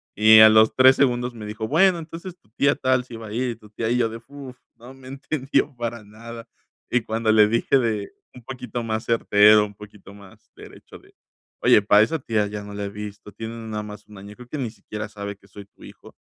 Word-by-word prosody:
Y 110 +1 +7
a 110 0 +9
los 110 0 +4
3 130 0 +6
segundos 125 -2 0
me 110 -2 -9
dijo: 110 +1 -5
"Bueno, 175 +4 +3
entonces 170 +3 -9
tu 105 - -33
tía 140 - +3
tal 130 -1 0
si 120 - -11
va 110 - -9
a 105 - -9
ir 125 +2 -1
y 115 - -7
tu 105 -1 -19
tía". 110 +2 -4
Y 120 - +1
yo 115 -2 +1
de 115 - -8
uf, 140 -3 -11 0.2
¿no? 120 +3 -14
me 130 -1 -15
entendió 135 0 -2
para 120 -1 -5
nada. 115 +2 -11 0.4
Y 125 - +1
cuando 110 0 -1
le 110 -1 +5
dije 115 +5 +1
de 110 -5 -2 0.2
un 125 - -13
poquito 125 -2 -6
más 110 -1 -3
certero, 105 -2 +4
un 105 -1 -12
poquito 105 -1 -14
más 100 -2 -18
derecho - - -14
de, - - -24 0.5
"oye, 105 - +5
pa 105 0 +5
esa 140 +9 +1
tía 110 -5 -1
ya 105 0 -7
no 105 0 -10
la 100 0 -5
he - - -5
visto, 105 0 -9
tiene 115 0 -8
no 115 -1 -9
nada 105 -1 -5
más 105 0 -11
un 105 -2 -14
año, 100 +2 -12
creo 125 +1 -14
que 155 - -5
ni 120 -4 -3
siquiera 105 -1 -8
sabe 100 -1 -7
que 100 - -24
soy 100 +1 -12
tu 100 - -22
hijo", - - -15
110 Hz, 245 wpm, -22 LUFS, 105-125 Hz, 0.5 s, a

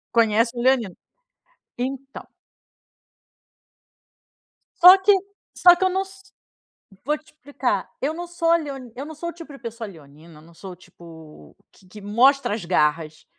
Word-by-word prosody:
Conhece 230 0 +3
o - - -2
leonino 245 -8 +1 0.8
Então. 270 +2 -6 2.6
Só 365 +2 +10
que 390 +2 +4 0.4
só 355 -1 +7
que 355 - -3
eu 375 - +3
não 380 +1 -1
s 385 0 -12 0.7
vou 300 +2 0
te 305 - -25
explicar, 260 -8 -3
eu 290 +4 -1
não 345 +2 -7
sou 335 -1 0
leoni 275 -7 -6
eu 275 - -6
não 315 +1 -10
sou 340 +3 -5
o - - -8
tipo 330 -2 -12
de 275 - -12
pessoa 230 -1 -7
leonina, 155 -2 -16
não 165 +2 -19
sou 185 +2 -10
tipo 160 - -16 0.2
q 190 - -23
que 210 +3 -13
mostra 245 +4 +2
as 210 -4 -5
garras. 155 -2 -1
250 Hz, 150 wpm, -22 LUFS, -, 2.6 s, Só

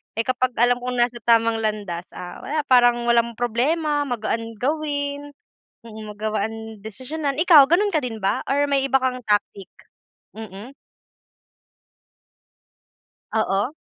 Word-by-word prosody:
Eh, 225 - 0
kapag 255 0 0
alam 245 +1 +3
kong 250 0 -4
nasa 240 0 +1
tamang 230 -1 +3
landas, 200 -5 -3
ah, 180 0 -8
wala 300 0 -2
parang 240 -1 +4
walang 235 0 +3
problema, 290 +6 0
magaan 230 -2 -3
gawin, 285 0 -2 0.5
mm, 220 -1 -10
magawaan 220 +1 -4
desisyonan 275 +6 -4
ikaw 305 -7 +8
gano'n 375 +7 +2
ka - - +4
din 225 -4 -5
ba 195 - 0
or 285 +1 +1
may 275 -1 +2
iba 270 0 +3
kang 255 -1 0
tactic? 205 -2 -1 0.7
Mm. 215 +2 -9 2.6
Oo, 215 +4 0
240 Hz, 125 wpm, -22 LUFS, 220-280 Hz, 2.6 s, ikaw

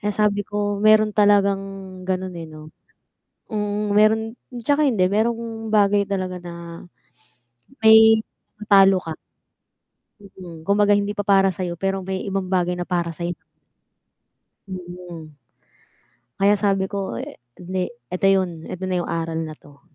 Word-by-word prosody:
Kaya 210 0 -1
sabi 210 -1 +2
ko 205 -1 -2
meron 215 0 +5
talagang 200 -1 +3 0.5
gano'n 185 0 -2
eh, 165 - -7
'no. 155 0 -12 0.8
Mm, 210 -1 -2
meron 215 +1 +4 0.4
tsaka 290 +3 +2
hindi 200 -8 +2
merong 225 0 -1
bagay 205 -1 +3
talaga 185 -2 -3
na 175 - -8 1.3
may 220 0 +8 0.5
talo 195 -1 +7
ka. 165 -3 -6 1.1
Mm, 180 -5 -12
kumbaga 205 +1 +3
hindi 205 0 -2
pa 205 - -2
para 195 -2 +3
sa'yo, 175 -2 -4
pero 195 0 -1
may 190 +1 -4
ibang 195 -2 -3
bagay 180 -1 +1
na 175 - -4
para 175 -2 -2
sayo. 170 +1 -4 1.3
Mm. 175 -3 -9 1.1
kaya 200 +1 +4
sabi 195 -1 +1
ko 195 - -4
e - - -7 0.2
hindi, 185 0 -3 0.2
eto 185 - -1
yun, 180 -4 0
eto 185 - -6
na 185 -1 -2
yung - - -6
aral 165 -1 -2
na 155 -1 -8
'to. 140 -1 -19
195 Hz, 140 wpm, -22 LUFS, 180-205 Hz, 1.3 s, may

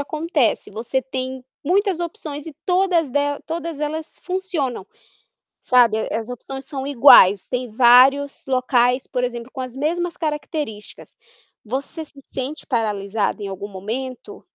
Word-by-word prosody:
acontece, 305 -4 0
você 235 +5 -2
tem 260 0 -5 0.2
muitas 380 +1 +1
opções 315 -5 -5
e 320 - -8
todas 360 -4 +2
de 265 - 0 0.3
todas 330 -2 -4
elas 310 +1 -4
funcionam, 355 - -2 0.8
sabe, 245 -4 +4 0.2
as 225 +1 -3
opções 270 +2 -7
são 270 -1 -5
iguais, 235 -8 +7
tem 250 -1 -3
vários 260 +5 +5
locais, 255 -1 +2
por 250 -1 -2
exemplo, 240 0 -5
com 265 - -6
as 255 -1 -7
mesmas 340 +5 -1
características. 300 -8 -5 0.5
Você 270 +7 -4
se 285 -2 -15
sente 270 +4 -4
paralisada 210 -4 -1
em - - -3
algum 195 +1 -6
momento? 230 +7 -6
265 Hz, 130 wpm, -21 LUFS, 240-310 Hz, 0.8 s, iguais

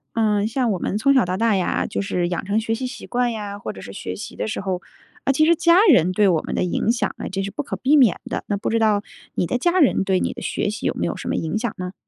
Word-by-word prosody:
嗯， 210 -2 +2
像 245 +1 0
我 190 - 0
们 200 - -2
从 275 +6 +3
小 260 -6 +4
到 180 +1 -2
大 225 0 +2
呀， 185 -2 0
就 - - -3
是 180 -3 -1
养 175 +2 -3
成 205 +3 +1
学 225 0 -1
习 255 +3 -4
习 250 - -7
惯 245 0 0
呀， 205 -3 -5
或 205 - -6
者 95 - -10
是 - - -9
学 90 - -5
习 95 - -8
的 - - -3
时 220 - -3
候， 190 -2 -2 0.4
呃， 275 - +2
其 310 - +3
实 335 +1 +5
家 335 +2 +5
人 180 - +4
对 205 +2 +3
我 170 -4 +3
们 - - -5
的 - - 0
影 180 +5 +1
响 235 - -1
呢， - - -6
这 195 0 -2
是 195 - -3
不 235 +9 -4
可 - - -4
避 280 +3 +3
免 240 -10 +4
的。 - - -4
那 205 - 0
不 200 - -2
知 230 - +1
道 215 -2 +2 0.3
你 175 - -1
的 250 - 0
家 345 +8 +2
人 280 - +4
对 190 -1 +1
你 - - -1
的 - - -9
学 - - -1
习 210 - -5
有 - - +1
没 - - -2
有 - - -4
什 - - -7
么 - - 0
影 160 +6 -2
响 230 -1 -2
呢？ 180 0 -5
210 Hz, 330 characters per minute, -22 LUFS, 190-245 Hz, 0.4 s, 实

